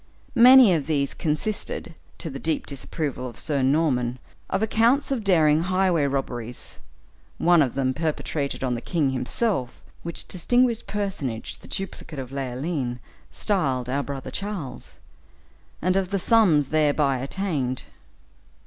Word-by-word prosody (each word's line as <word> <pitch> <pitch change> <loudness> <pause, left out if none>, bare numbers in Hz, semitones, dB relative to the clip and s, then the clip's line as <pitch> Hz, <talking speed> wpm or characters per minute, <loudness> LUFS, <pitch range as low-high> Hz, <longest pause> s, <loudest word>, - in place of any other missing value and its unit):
Many 250 -4 +9
of 150 -4 -1
these 140 -3 0
consisted, 165 +3 -2 0.2
to 165 - -4
the 135 - -6
deep 160 +1 -1
disapproval 140 -1 -4
of 120 - -13
Sir 145 -3 -1
Norman, 130 -3 +1 0.3
of 195 +3 0
accounts 235 +6 +2
of 250 -5 -1
daring 160 -5 +4
highway 185 -3 +2
robberies, 125 -3 -4 0.6
one 175 -1 +5
of 130 -5 0
them 130 -1 +1
perpetrated 150 -2 -2
on 125 -2 0
the 120 - -3
king 150 -4 0
himself, 130 - -1 0.2
which 170 0 -5
distinguished 235 +6 +1
personage 180 - -4
the - - -13
duplicate 190 -5 -6
of 130 -1 -6
Leoline 135 -1 -3 0.3
styled 135 - -1
"our 140 +2 0
brother 140 -2 -6
Charles," 195 -9 -6 0.9
and 185 +2 +2
of 190 -2 +1
the 200 - 0
sums 180 - +4
thereby 145 -3 +2
attained. 140 -4 -2
150 Hz, 135 wpm, -24 LUFS, 135-190 Hz, 0.9 s, Many